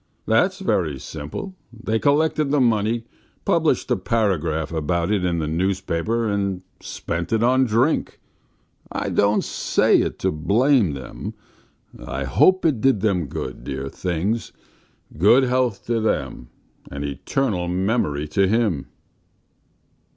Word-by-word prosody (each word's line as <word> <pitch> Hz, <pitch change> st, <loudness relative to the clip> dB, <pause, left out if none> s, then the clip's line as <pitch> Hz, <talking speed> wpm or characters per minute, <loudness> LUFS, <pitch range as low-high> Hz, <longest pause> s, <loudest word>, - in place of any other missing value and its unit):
That's 180 Hz, -, +2 dB
very 85 Hz, -, 0 dB
simple. 75 Hz, -, -7 dB, 0.2 s
They 110 Hz, -1 st, -2 dB
collected 150 Hz, +1 st, +2 dB
the 145 Hz, +1 st, +2 dB
money, 115 Hz, -1 st, +1 dB, 0.4 s
published -, -, +1 dB
a -, -, +4 dB
paragraph 85 Hz, -8 st, 0 dB
about 85 Hz, +3 st, -1 dB
it 100 Hz, -3 st, +1 dB
in 90 Hz, -1 st, 0 dB
the 80 Hz, -, -1 dB
newspaper, 95 Hz, +6 st, -1 dB
and 100 Hz, -3 st, -1 dB, 0.2 s
spent 85 Hz, 0 st, -5 dB
it 110 Hz, 0 st, +2 dB
on 130 Hz, +2 st, +4 dB
drink.... 120 Hz, +7 st, +1 dB, 0.7 s
I -, -, -2 dB
don't 100 Hz, +1 st, +2 dB
say -, -, +2 dB
it -, -, -3 dB
to -, -, 0 dB
blame 105 Hz, -, +2 dB
them.... 65 Hz, -2 st, -7 dB, 0.7 s
I 70 Hz, +2 st, -4 dB
hope 185 Hz, -, +3 dB
it 140 Hz, -9 st, +2 dB
did 135 Hz, -7 st, +3 dB
them 95 Hz, -7 st, +1 dB
good, 65 Hz, -1 st, -6 dB
dear 70 Hz, 0 st, -4 dB
things! 95 Hz, +8 st, -2 dB, 0.7 s
Good 115 Hz, +9 st, +6 dB
health 125 Hz, -4 st, 0 dB
to 115 Hz, -1 st, 0 dB
them, 110 Hz, -, -2 dB, 0.4 s
and 70 Hz, +1 st, -5 dB
eternal 90 Hz, -, -1 dB
memory 90 Hz, -5 st, 0 dB
to 95 Hz, +5 st, +2 dB
him." 105 Hz, -, 0 dB
100 Hz, 130 wpm, -22 LUFS, 80-120 Hz, 0.7 s, Good